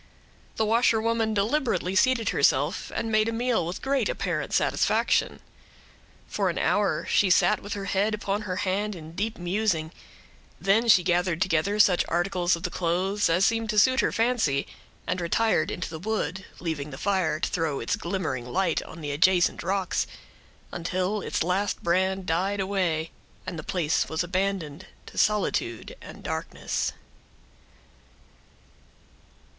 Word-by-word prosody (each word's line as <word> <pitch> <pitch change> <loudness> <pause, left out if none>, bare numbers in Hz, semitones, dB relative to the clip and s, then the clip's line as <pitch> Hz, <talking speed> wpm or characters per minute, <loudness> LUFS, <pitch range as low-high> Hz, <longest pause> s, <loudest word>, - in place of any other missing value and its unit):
The 220 - +1
washerwoman 225 -1 +2
deliberately 210 -3 0
seated 250 +2 +3
herself, - - +1
and 225 - -2
made 215 +1 +3
a - - -1
meal 235 -6 0
with 175 - -6
great 275 - +1
apparent - - -2
satisfaction. - - +1 0.9
For - - 0
an - - -3
hour, - - +1
she 200 - +3
sat 180 - +4
with 205 - -5
her 200 -1 -5
head 200 +3 +1
upon 205 0 -2
her 185 -4 -4
hand, 200 +3 -1
in 160 -2 -10
deep 215 +6 -3
musing; 175 -3 -1 0.7
then 220 +5 +2
she 190 -5 +6
gathered 175 -1 +1
together 185 +3 +1
such 190 -4 +5
articles 175 0 +1
of 170 - -10
the 180 - -2
clothes, 185 +4 0
as 175 +4 +3
seemed 225 -1 0
to 215 - -1
suit 260 +5 +5
her - - +2
fancy, 225 - +1 0.4
and 180 - -2
retired 175 0 +1
into 185 - -4
the 160 - -7
wood, 190 -1 -3
leaving 155 -4 -3
the 130 - -8
fire 185 -5 0
to - - 0
throw 160 -5 -1
its 115 - -1
glimmering 150 -9 -3
light 185 -2 +1
on 160 - -11
the 145 -1 -3
adjacent 175 +4 +3
rocks, 190 +1 -1 0.6
until 185 +4 -2
its - - -1
last 190 +4 -1
brand 190 +2 +1
died 190 +5 0
away, 180 -5 -1 0.3
and 175 -3 -5
the - - -4
place 165 -1 0
was 160 +2 -1
abandoned 185 -2 -2 0.2
to - - -13
solitude 200 - 0
and - - -11
darkness. - - -3
190 Hz, 150 wpm, -26 LUFS, 170-210 Hz, 0.9 s, she